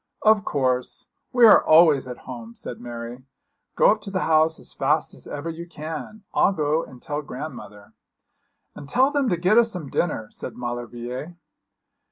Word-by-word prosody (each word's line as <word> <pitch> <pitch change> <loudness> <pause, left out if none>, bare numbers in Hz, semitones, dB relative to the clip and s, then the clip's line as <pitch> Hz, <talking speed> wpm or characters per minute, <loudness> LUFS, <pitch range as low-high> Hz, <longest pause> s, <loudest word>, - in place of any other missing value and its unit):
'Of 215 -1 +5
course. 130 -5 -1 0.3
We 245 -2 +6
are 220 - +8
always 155 -5 +5
at 125 -1 -9
home,' 115 -2 -8
said 120 - -8
Mary; 120 +1 -7 0.5
'go - - +6
up - - -1
to 200 - -7
the 190 -2 -2
house 160 0 +3
as - - -9
fast - - 0
as - - -10
ever 145 +3 -6
you 165 +1 -6
can. 165 +6 -7
I'll - - +3
go 155 -1 0
and 125 - -12
tell 150 +2 -4
grandmother.' 125 -8 -9 0.8
'And 140 - -10
tell 260 - +3
them 285 -4 +1
to 175 - +1
get 185 +7 +4
us 230 -1 +3
some 170 -9 -6
dinner,' 115 -11 -1
said - - -7
Maulevrier. 120 +6 -6
155 Hz, 175 wpm, -24 LUFS, 125-180 Hz, 0.8 s, are